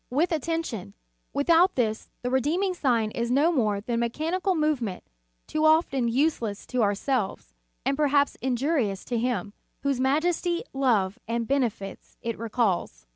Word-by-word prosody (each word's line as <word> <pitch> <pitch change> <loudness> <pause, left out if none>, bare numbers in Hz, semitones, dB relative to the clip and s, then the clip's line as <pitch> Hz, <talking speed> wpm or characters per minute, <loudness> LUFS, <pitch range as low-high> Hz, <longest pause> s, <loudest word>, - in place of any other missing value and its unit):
With 305 +9 +1
attention; 320 - -2 0.4
without 335 +5 +4
this, 220 -3 -1
the 250 - -1
redeem 295 +9 +1
ing 380 -2 +1
sign 235 -10 +1
is 235 +1 -2
no 285 +7 +4
more 215 -10 +1
than 230 +4 -4
a - - +1
mechanical 325 +11 0
move 305 -3 +1
o - - -21
o - - 0
ment, 185 -3 -6 0.4
too 310 - -1
often 310 -6 +3
useless 235 -5 0
to 250 - +2
ourselves, 205 - -1 0.3
and 275 - +2
perhaps 285 -1 +3
injurious 255 - 0
to 240 -2 -1
Him, 240 -4 -1 0.3
whose 280 -2 0
majesty, 340 +6 +1
love 225 -8 +1
and 230 0 -1
benefits 240 -8 -2
it 230 -1 -3
recalls. 210 - -1
255 Hz, 160 wpm, -26 LUFS, 225-310 Hz, 0.4 s, without